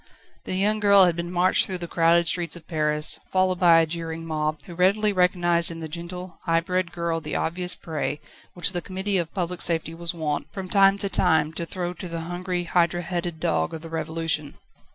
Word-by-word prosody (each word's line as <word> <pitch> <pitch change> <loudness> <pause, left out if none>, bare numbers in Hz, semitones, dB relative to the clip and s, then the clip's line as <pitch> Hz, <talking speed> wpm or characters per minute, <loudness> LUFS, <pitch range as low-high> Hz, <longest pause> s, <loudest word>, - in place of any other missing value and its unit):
The - - -3
young 210 +3 +1
girl 200 -2 +6
had 175 -2 +1
been 170 +1 -4
marched 180 +1 +2
through 185 - -2
the 175 -1 -6
crowded 170 +1 +3
streets 170 -1 0
of 170 -2 -13
Paris, 150 -2 -1
followed 185 -1 +1
by 170 -2 +6
a - - +2
jeering 165 0 -5
mob, 155 -1 -2
who 175 - -10
readily 200 +4 +2
recognised 175 -2 +4
in 165 -1 -6
the 160 - -5
gentle, 170 +2 -8
high 165 -1 +2
bred 180 0 -2
girl 170 -1 -2
the 150 - -5
obvious 180 +2 -1
prey, 150 -2 -4 0.4
which 175 +2 +2
the 175 -2 -3
Committee 190 +1 -1
of 165 -2 -3
Public 180 -2 -3
Safety 165 -1 0
was 170 +1 -3
wont, 155 -4 -3
from 190 -2 -6
time 195 +1 +4
to 200 - +1
time 160 -5 +2
to 170 +1 -4
throw 175 -1 -4
to 180 - -8
the 165 -1 -5
hungry 175 +1 -3
hydra 175 0 +1
headed 175 -1 -4
dog 80 - 0
of 160 - -9
the 165 - -8
Revolution. 160 -2 -3
170 Hz, 210 wpm, -24 LUFS, 165-180 Hz, 0.4 s, girl